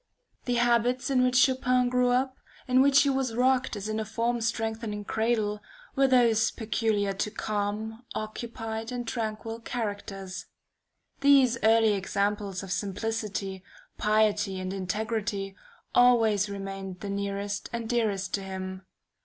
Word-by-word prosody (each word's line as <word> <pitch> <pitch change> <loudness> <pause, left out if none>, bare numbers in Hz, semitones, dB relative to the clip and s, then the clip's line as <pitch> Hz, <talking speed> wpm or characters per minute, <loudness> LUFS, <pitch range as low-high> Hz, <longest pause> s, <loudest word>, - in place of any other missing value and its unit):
The 245 - 0
habits 240 +2 +2
in 255 -2 +4
which 250 0 +2
Chopin 255 -1 +3
grew 250 0 +2
up, 260 +1 +1 0.3
in 255 0 +5
which 275 0 +6
he 280 - +2
was 265 -4 -1
rocked 255 0 +2
as 205 0 -5
in 215 0 -2
a - - -1
form 235 +2 -1
strengthening 220 -2 -2
cradle, 220 -2 0 0.3
were 270 -1 +4
those 230 -4 +4
peculiar 215 -3 -1
to 200 +2 -2
calm, 215 +2 -3
occupied, 225 +1 -5
and 245 -1 -4
tranquil 225 0 -3
characters. 200 -5 -5 0.7
These 270 -4 +5
early 220 -1 +5
examples 200 0 -1
of 190 - -7
simplicity, 200 -1 -3 0.4
piety, 210 -2 +2
and 185 0 -4
integrity, 200 0 -2 0.4
always 225 -5 +4
remained 195 -2 -6
the 205 - -5
nearest 200 0 -3
and 235 -1 -4
dearest 215 -5 0
to 200 - 0
him. 190 -1 -6
220 Hz, 135 wpm, -28 LUFS, 200-240 Hz, 0.7 s, which